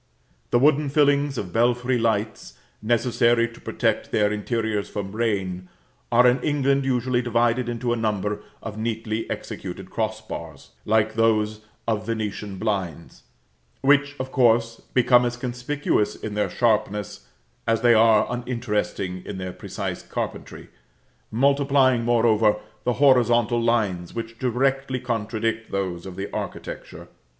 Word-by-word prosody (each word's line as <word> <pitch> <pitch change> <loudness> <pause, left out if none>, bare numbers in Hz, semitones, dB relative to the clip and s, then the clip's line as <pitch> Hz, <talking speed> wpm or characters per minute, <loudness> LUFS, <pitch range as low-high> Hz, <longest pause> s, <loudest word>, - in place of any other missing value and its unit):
The - - +3
wooden 150 +2 +3
fillings 145 -1 +2
of 90 -5 -5
belfry 125 +2 +2
lights, 110 -1 -1 0.2
necessary 120 +1 +2
to 115 - -15
protect - - -1
their 105 -1 +2
interiors 105 0 -2
from 100 0 -5
rain, 95 -5 -2 0.4
are 120 +1 +5
in 125 +2 +4
England 140 -2 +1
usually 125 -1 +1
divided 120 +1 +1
into 120 0 -1
a - - -2
number 105 -2 -1 0.2
of 110 -1 -6
neatly 110 0 -3
executed 95 0 -6
cross 110 -1 -2
bars, 110 - -9
like 110 0 +2
those 110 -1 +1 0.3
of 110 -1 -1
Venetian 105 -3 -3
blinds, 95 -7 -3 0.6
which, 145 +1 +3
of 130 0 -4
course, 115 -3 +3 0.2
become 125 -1 +5
as 120 0 -2
conspicuous 125 -1 -1
in 105 - -6
their 105 0 0
sharpness 105 -4 0 0.4
as 115 0 +2
they 120 0 +6
are 110 -1 +5
uninteresting 115 -7 -3
in 100 - -6
their 95 -1 -5
precise - - -5
carpentry, - - -6 0.6
multiplying, 135 0 +3
moreover, 115 -2 +3 0.3
the 125 - +2
horizontal 120 -3 +4
lines 105 -7 0
which 115 0 -6
directly 130 +1 0
contradict 115 -1 -2
those 95 -3 -3
of 95 - -8
the 95 +2 -4
architecture. - - -6
115 Hz, 130 wpm, -24 LUFS, 105-125 Hz, 0.6 s, they